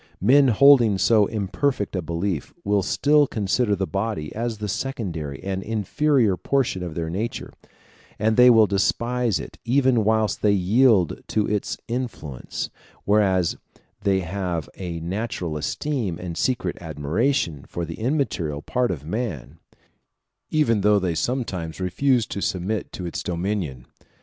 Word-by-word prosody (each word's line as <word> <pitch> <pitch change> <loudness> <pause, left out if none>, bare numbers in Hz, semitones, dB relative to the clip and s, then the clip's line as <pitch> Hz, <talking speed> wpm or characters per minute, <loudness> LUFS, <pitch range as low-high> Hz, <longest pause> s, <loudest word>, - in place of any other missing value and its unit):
Men 135 +7 +5
holding 120 -3 +6
so 105 0 +4
imperfect 100 +2 -1
a 90 - 0
belief 85 +1 -3
will 100 0 +2
still 145 +8 +3
consider 105 +1 0
the 95 0 -1
body 100 -5 -3
as 115 0 -3
the 105 0 -4
secondary 90 - -4
and 95 0 -2
inferior 115 - +1
portion 130 -8 0
of 85 -3 -5
their 85 -1 -2
nature, 105 +8 -4 0.6
and 110 +1 +1
they 125 +1 +8
will 115 -2 +7
despise 115 +3 0
it - - -9
even 125 -1 +3
whilst 110 0 +1
they 105 -1 +4
yield 100 - +3
to 105 -1 +1
its 105 -1 -2
influence; 115 - -5 0.3
whereas 95 -4 +2 0.4
they 95 -1 +2
have 90 -3 -3
a 85 -3 -5
natural 90 -2 -3
esteem 100 - -2
and 90 -2 -6
secret 130 +5 -1
admiration 80 - -1
for 85 - -4
the 80 0 -8
immaterial 110 - -1
part 125 -1 0
of 75 -5 -4
man, 80 - -4 0.9
even 115 -9 +2
though 105 +1 +4
they 90 -4 0
sometimes 90 -5 -3
refuse 120 +7 +1
to 100 - -5
submit 95 +3 -2
to 90 - -6
its 85 - -4
dominion. 85 -8 -3
100 Hz, 140 wpm, -23 LUFS, 85-120 Hz, 0.9 s, they